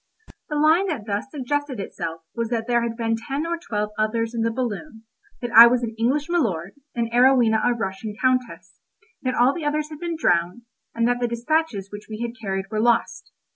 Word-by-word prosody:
The 300 - -2
line 315 +6 +4
that 285 - -3
thus 205 +3 -2
suggested 290 -2 -3
itself 165 -4 -5
was 230 -1 -2
that 230 -2 -1
there 240 0 +2
had 230 -1 -3
been 225 -1 0
ten 275 +7 -4
or 340 +1 -1
twelve 210 -9 -3
others 225 +2 0
in 230 - -2
the 230 - +2
balloon, 230 0 -4 0.4
that 240 -1 -4
I 235 0 +11
was 245 0 +1
an 225 -1 -3
English 260 +6 0
Milord, 200 - -1 0.2
and 235 -1 0
Arowhena 245 -3 +4
a - - +3
Russian 205 -1 -4
Countess; 255 -1 -1 0.4
that 255 -1 -1
all 250 +3 +4
the 340 - -5
others 300 +1 -1
had 305 - -8
been 340 -1 -3
drowned, 175 - +1 0.3
and 230 0 +2
that 245 0 +1
the 240 - 0
despatches 235 -3 -1
which 205 0 -9
we 215 0 -6
had 235 0 -3
carried 195 -2 -2
were 215 0 0
lost. 235 0 +1
235 Hz, 205 wpm, -23 LUFS, 220-270 Hz, 0.4 s, I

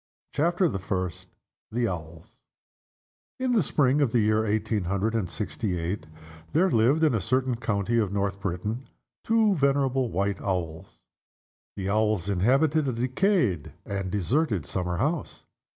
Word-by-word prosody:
CHAPTER 175 +4 +2
THE 95 - -2
FIRST. 90 -1 -3 0.4
THE 120 +1 +1
OWLS. 80 -3 -7 1.0
IN 255 -1 0
the 230 -4 +4
spring 140 -2 +2
of 135 -6 +2
the 120 - +3
year 110 0 +3
eighteen 110 -2 0
hundred 100 +5 0
and 105 -7 -1
sixty 105 -1 -3
eight 85 +1 -3 0.5
there 185 +4 +3
lived, 125 +8 +3
in 155 -4 +4
a 110 - +1
certain 130 +6 +1
county 115 0 0
of 105 -4 0
North 100 0 -1
Britain, 105 +6 -3 0.4
two 225 -2 +3
venerable 135 -4 +2
White 100 0 -1
Owls. 90 -2 -4 0.7
The 95 -1 -3
Owls 105 -3 +1
inhabited 135 - +2
a 130 - 0
decayed 125 - +1
and 95 -2 -3
deserted 105 - 0
summer 90 -2 -2
house. 150 - -2
110 Hz, 145 wpm, -27 LUFS, 95-135 Hz, 1.0 s, the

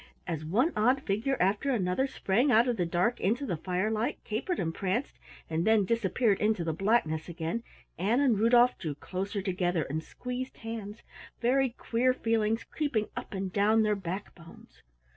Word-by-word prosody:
As 160 -2 -3
one 230 - +1
odd 250 +6 +2
figure 220 +7 0
after 200 +9 +1
another 215 +1 +1
sprang 245 +2 +1
out 235 +2 +5
of 245 - +1
the 175 -5 -1
dark 180 +8 +1
into 235 +9 0
the 180 - -1
firelight, 205 +7 -1
capered 235 - -2
and 165 -2 -1
pranced, 195 +10 -2 0.3
and 160 +1 -1
then 220 -1 +4
disappeared 225 0 +1
into 210 -4 +1
the 165 -1 -1
blackness 175 -4 +1
again, 170 +6 -3 0.4
Ann 215 +8 +2
and 255 -8 +3
Rudolf 240 +2 +5
drew 155 -5 -4
closer 195 +5 -4
together 180 -3 0
and 150 +3 -3
squeezed 250 +8 -6
hands, 225 -1 -7 0.4
very 260 +2 +2
queer 245 +1 0
feelings 225 -1 0
creeping 275 -9 -2
up - - -6
and 190 -1 -3
down 215 +2 +4
their 210 -1 +2
back 195 +1 -5
bones. 165 -2 -16
215 Hz, 170 wpm, -29 LUFS, 180-240 Hz, 0.4 s, out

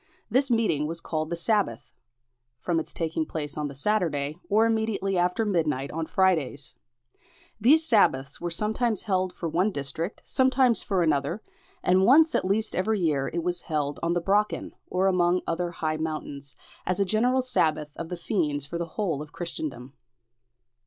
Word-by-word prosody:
This 265 +3 +2
meeting 215 -11 +1
was 165 +1 -4
called 155 -2 -3
the 170 - -1
Sabbath, 195 - -1 0.7
from 170 +3 0
its 160 - -6
taking 160 -1 -2
place 150 -2 -5
on 150 -1 -2
the 140 - -8
Saturday, 150 -4 0
or 215 +2 +4
immediately 220 -3 0
after 180 +5 +1
midnight 155 -8 0
on 160 0 -3
Fridays. 160 -7 +1 0.9
These 300 +9 +5
sabbaths 140 - +2
were 175 - -2
sometimes 215 +5 -1
held 185 -3 0
for 175 -1 -5
one 180 +6 +1
district, 160 +5 -4
sometimes 260 -2 +3
for 190 -3 0
another, 155 +5 0 0.4
and 185 +1 +4
once 310 +9 +6
at - - +1
least 215 +3 0
every 210 +3 +1
year 150 -6 +1
it 170 0 -2
was 175 0 -2
held 145 -3 -2
on 170 +1 +1
the 175 - 0
Brocken, 205 +4 0 0.2
or 185 +1 0
among 180 -1 +3
other 175 +1 -1
high 155 -2 -2
mountains, 145 -4 -5 0.3
as 185 +1 -1
a 200 - +3
general 245 +6 +2
sabbath 155 -11 0
of 165 -1 -6
the 180 - -4
fiends 155 - -1
for 170 +4 -5
the 170 - -2
whole 175 -9 -1
of 150 0 -9
Christendom. 170 - -5
175 Hz, 170 wpm, -26 LUFS, 155-210 Hz, 0.9 s, once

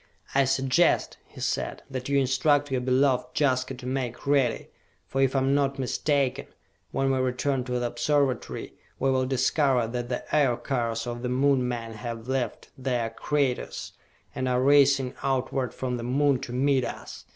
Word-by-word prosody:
"I 140 0 +4
suggest," 135 +5 +2
he - - -12
said, - - -2
"that 130 0 -5
you 140 - +2
instruct 140 +2 +2
your 130 -1 0
beloved 130 0 +1
Jaska 130 -2 +1
to 125 0 -11
make 125 -2 -3
ready; 140 -4 +1 0.4
for 135 - -1
if 135 0 +2
I - - +4
am 135 +1 +2
not 140 -1 +1
mistaken, 135 0 0 0.4
when 135 +8 0
we 130 - +1
return 130 +1 0
to 125 - -4
the 120 - -1
Observatory 130 +3 -1 0.2
we 135 0 +1
will 130 -1 +1
discover 130 -1 +2
that 120 +1 -4
the 125 - -3
Aircars 120 -4 0
of 120 0 -5
the 125 - -2
Moon 130 0 +2
men 115 -2 -4
have 115 +1 -6
left 130 -4 -3
their 125 -3 -1
craters 140 +1 -2 0.4
and 130 0 -2
are 125 0 +2
racing 140 -2 +4
outward 130 -1 -1
from 125 -1 -3
the 120 - -5
Moon 135 +2 +2
to 120 - -7
meet 130 +1 +2
us! - - -7
130 Hz, 170 wpm, -26 LUFS, 125-135 Hz, 0.4 s, I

